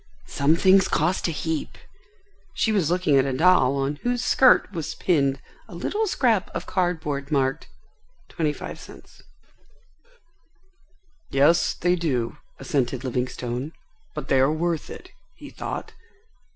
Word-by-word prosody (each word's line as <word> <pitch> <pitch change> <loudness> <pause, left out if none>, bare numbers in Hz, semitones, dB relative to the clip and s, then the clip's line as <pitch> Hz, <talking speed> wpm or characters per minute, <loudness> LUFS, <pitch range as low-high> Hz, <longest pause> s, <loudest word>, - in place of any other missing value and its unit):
"Some 145 +3 +1
things 190 +2 +4
cost 170 +4 0
a - - -1
heap." 160 0 -4 0.8
She 220 - +1
was 190 -8 +1
looking 175 -5 +2
at 135 - +2
a 135 -2 -2
doll 150 -5 +4
on 140 +2 -2
whose 245 +6 -2
skirt 260 -5 +4
was 165 -3 -4
pinned 140 -6 +1 0.3
a - - -11
little 435 +1 -2
scrap 235 - +1
of - - -4
card 180 -2 0
board 140 -2 -5
marked, 135 -2 0 0.6
"25c." 150 -3 -6 2.1
"Yes, 145 +5 +3
they 175 +1 +1
do," 145 -7 -2 0.2
assented 130 -2 -2
Livingstone. 125 +2 -3 0.4
"But 150 -3 -5
they 135 - +3
are 135 +3 +4
worth 165 0 -2
it," 370 - -11 0.2
he - - -12
thought. - - -6
155 Hz, 130 wpm, -24 LUFS, 135-180 Hz, 2.1 s, things